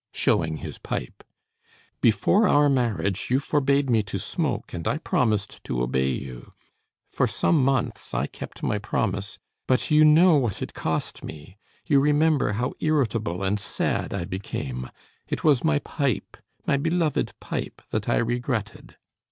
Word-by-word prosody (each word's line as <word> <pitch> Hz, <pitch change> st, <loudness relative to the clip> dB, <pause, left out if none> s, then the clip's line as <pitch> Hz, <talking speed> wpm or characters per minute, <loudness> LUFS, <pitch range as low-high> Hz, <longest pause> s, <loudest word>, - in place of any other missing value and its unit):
(Showing 80 Hz, -2 st, +1 dB
his -, -, -7 dB
pipe.) -, -, -5 dB, 0.8 s
"Before 195 Hz, -, +4 dB
our 145 Hz, -3 st, +5 dB
marriage, 105 Hz, -7 st, 0 dB
you 130 Hz, +2 st, +3 dB
forbade 140 Hz, -1 st, +1 dB
me 115 Hz, -3 st, +3 dB
to 95 Hz, -2 st, -5 dB
smoke, -, -, -3 dB
and 85 Hz, -2 st, -4 dB
I 145 Hz, -, +1 dB
promised 110 Hz, -10 st, 0 dB
to 65 Hz, -, -2 dB
obey 65 Hz, +2 st, +1 dB
you. 65 Hz, -2 st, -6 dB, 0.5 s
For -, -, 0 dB
some 155 Hz, -5 st, +2 dB
months 135 Hz, -2 st, 0 dB
I -, -, 0 dB
kept -, -, -9 dB
my 105 Hz, -, 0 dB
promise; 105 Hz, -1 st, -2 dB, 0.3 s
but 130 Hz, +3 st, +1 dB
you 150 Hz, 0 st, +6 dB
know 155 Hz, +2 st, +7 dB
what 120 Hz, -8 st, -1 dB
it -, -, -7 dB
cost 80 Hz, -1 st, -3 dB
me; 80 Hz, +5 st, -9 dB, 0.3 s
you 145 Hz, -4 st, +4 dB
remember 150 Hz, -3 st, +3 dB
how 120 Hz, +5 st, -1 dB
irritable 115 Hz, -, 0 dB
and 100 Hz, +2 st, +1 dB
sad -, -, -2 dB
I 95 Hz, -4 st, -2 dB
became. 65 Hz, -9 st, -5 dB, 0.4 s
It -, -, -3 dB
was 145 Hz, -5 st, +4 dB
my 160 Hz, -2 st, +3 dB
pipe, 140 Hz, -4 st, -2 dB, 0.3 s
my 140 Hz, -, +2 dB
beloved 160 Hz, +1 st, 0 dB
pipe, -, -, -5 dB
that -, -, -2 dB
I -, -, +3 dB
regretted. 120 Hz, -2 st, -2 dB
120 Hz, 150 wpm, -25 LUFS, 95-145 Hz, 0.8 s, know